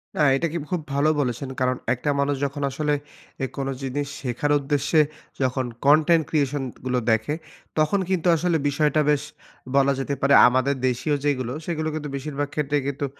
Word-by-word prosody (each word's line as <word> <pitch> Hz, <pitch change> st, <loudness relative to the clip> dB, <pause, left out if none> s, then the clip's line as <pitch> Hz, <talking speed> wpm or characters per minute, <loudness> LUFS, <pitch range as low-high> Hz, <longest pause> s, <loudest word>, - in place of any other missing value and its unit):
না -, -, -5 dB, 0.2 s
এইটা 165 Hz, +5 st, 0 dB
কি -, -, -1 dB
খুব 180 Hz, -3 st, 0 dB
ভালো 145 Hz, +2 st, +3 dB
বলেছেন। 130 Hz, 0 st, -3 dB
কারণ 130 Hz, 0 st, +1 dB, 0.2 s
একটা 130 Hz, +4 st, -3 dB
মানুষ 140 Hz, 0 st, +1 dB
যখন 140 Hz, +1 st, -4 dB
আসলে 150 Hz, +2 st, 0 dB, 0.5 s
এ -, -, +2 dB
কোনো 135 Hz, 0 st, -2 dB
জিনিস 140 Hz, +2 st, -2 dB
শেখার 130 Hz, +3 st, -1 dB
উদ্দেশ্যে 145 Hz, +2 st, +1 dB, 0.4 s
যখন 130 Hz, 0 st, 0 dB, 0.2 s
কনটেন্ট 155 Hz, +3 st, +5 dB
ক্রিয়েশন 145 Hz, -2 st, 0 dB, 0.2 s
গুলো 125 Hz, -1 st, +1 dB
দেখে, 110 Hz, +6 st, +1 dB, 0.5 s
তখন 155 Hz, +6 st, +2 dB
কিন্তু 185 Hz, -2 st, 0 dB
আসলে 170 Hz, +1 st, +1 dB
বিষয়টা 150 Hz, +1 st, +2 dB
বেশ 150 Hz, -1 st, +2 dB, 0.5 s
বলা 140 Hz, 0 st, +4 dB
যেতে 140 Hz, +1 st, -2 dB
পারে, 140 Hz, +1 st, +4 dB
আমাদের 130 Hz, +3 st, +2 dB
দেশীয় 130 Hz, +4 st, 0 dB
যেইগুলো 130 Hz, -4 st, 0 dB
সেগুলো 155 Hz, -2 st, -2 dB
কিন্তু 150 Hz, -1 st, -4 dB
বেশিরভাগ 145 Hz, +1 st, -3 dB
ক্ষেত্রেই 145 Hz, -1 st, 0 dB
কিন্তু 140 Hz, 0 st, -2 dB
145 Hz, 170 wpm, -24 LUFS, 135-150 Hz, 0.5 s, কনটেন্ট